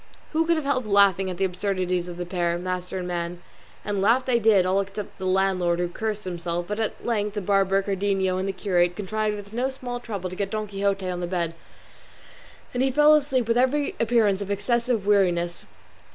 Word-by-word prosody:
Who 325 Hz, +1 st, +1 dB
could 335 Hz, -, +4 dB
have 315 Hz, -3 st, -2 dB
helped 255 Hz, -5 st, 0 dB
laughing 200 Hz, -2 st, +4 dB
at 180 Hz, -, -5 dB
the 195 Hz, -, +1 dB
absurdities 185 Hz, -1 st, -1 dB
of 175 Hz, -, -8 dB
the 175 Hz, -, -4 dB
pair, 175 Hz, -1 st, -1 dB
master 180 Hz, +1 st, -4 dB
and 180 Hz, -1 st, -4 dB
man? 175 Hz, 0 st, -3 dB, 0.5 s
And 205 Hz, -2 st, -1 dB
laugh 235 Hz, +6 st, +3 dB
they 245 Hz, -2 st, +2 dB
did, 210 Hz, -4 st, +4 dB
all 185 Hz, +2 st, +2 dB
except 200 Hz, +1 st, -7 dB
the 190 Hz, -, -3 dB
landlord, 185 Hz, -2 st, +2 dB
who 175 Hz, 0 st, 0 dB
cursed 215 Hz, +3 st, -3 dB
himself; 175 Hz, -1 st, -3 dB
but 210 Hz, +1 st, -3 dB
at 220 Hz, -, -3 dB
length 210 Hz, -3 st, -1 dB
the 205 Hz, -, -1 dB
barber, 195 Hz, 0 st, +2 dB
Cardenio, 195 Hz, -1 st, 0 dB
and 190 Hz, -, -2 dB
the -, -, +1 dB
curate 180 Hz, -2 st, +1 dB
contrived 210 Hz, +2 st, -2 dB
with 205 Hz, 0 st, -10 dB
no 250 Hz, +3 st, 0 dB
small 250 Hz, -2 st, -6 dB
trouble 200 Hz, -6 st, -5 dB
to -, -, -6 dB
get 195 Hz, +1 st, -2 dB
Don 215 Hz, 0 st, -2 dB
Quixote 195 Hz, -1 st, -1 dB
on 180 Hz, -1 st, -3 dB
the 175 Hz, -, -3 dB
bed, 170 Hz, -2 st, -1 dB, 1.2 s
and 245 Hz, -, 0 dB
he 265 Hz, -, +3 dB
fell 295 Hz, +3 st, +6 dB
asleep 270 Hz, -5 st, +2 dB
with 230 Hz, +1 st, +2 dB
every 275 Hz, +3 st, +1 dB
appearance 220 Hz, -4 st, +2 dB
of 200 Hz, -, -5 dB
excessive 235 Hz, +2 st, 0 dB
weariness. 175 Hz, -4 st, +1 dB
195 Hz, 210 wpm, -25 LUFS, 185-220 Hz, 1.2 s, fell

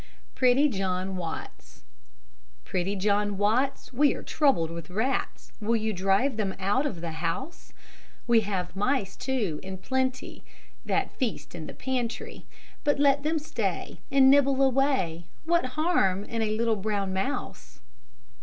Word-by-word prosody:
PRETTY 260 Hz, +3 st, +4 dB
JOHN 190 Hz, -3 st, -2 dB
WATTS 160 Hz, -, -7 dB, 0.8 s
Pretty 185 Hz, +2 st, -1 dB
John 205 Hz, +1 st, +1 dB
Watts, 240 Hz, +8 st, 0 dB
We 285 Hz, +3 st, +3 dB
are -, -, -7 dB
troubled 265 Hz, -, +2 dB
with 170 Hz, +1 st, -7 dB
rats. 220 Hz, +9 st, -2 dB
Will 225 Hz, +2 st, +1 dB
you 220 Hz, -1 st, 0 dB
drive 195 Hz, +7 st, +1 dB
them 200 Hz, -3 st, -1 dB
out 205 Hz, +10 st, +1 dB
of 180 Hz, -, -5 dB
the 170 Hz, -1 st, -4 dB
house? 165 Hz, -, -4 dB, 0.5 s
We 235 Hz, -1 st, +5 dB
have 195 Hz, -3 st, -3 dB
mice, 205 Hz, -1 st, 0 dB
too, 245 Hz, -, -2 dB
in 190 Hz, 0 st, -6 dB
plenty, 260 Hz, +5 st, -2 dB, 0.4 s
That -, -, 0 dB
feast 250 Hz, -6 st, -3 dB
in 160 Hz, -2 st, -7 dB
the -, -, -9 dB
pantry, 250 Hz, -3 st, -4 dB, 0.4 s
But 290 Hz, -1 st, +2 dB
let 280 Hz, 0 st, +4 dB
them 310 Hz, +2 st, 0 dB
stay 310 Hz, +1 st, -3 dB
And 270 Hz, -2 st, +6 dB
nibble 275 Hz, -1 st, +4 dB
away, 260 Hz, -, +1 dB, 0.2 s
What 340 Hz, -2 st, +2 dB
harm 200 Hz, -, +2 dB
in 230 Hz, +1 st, -3 dB
a 215 Hz, -1 st, 0 dB
little 230 Hz, -1 st, +1 dB
brown 200 Hz, -1 st, -1 dB
mouse? 195 Hz, +10 st, -4 dB
220 Hz, 145 wpm, -27 LUFS, 190-270 Hz, 0.8 s, And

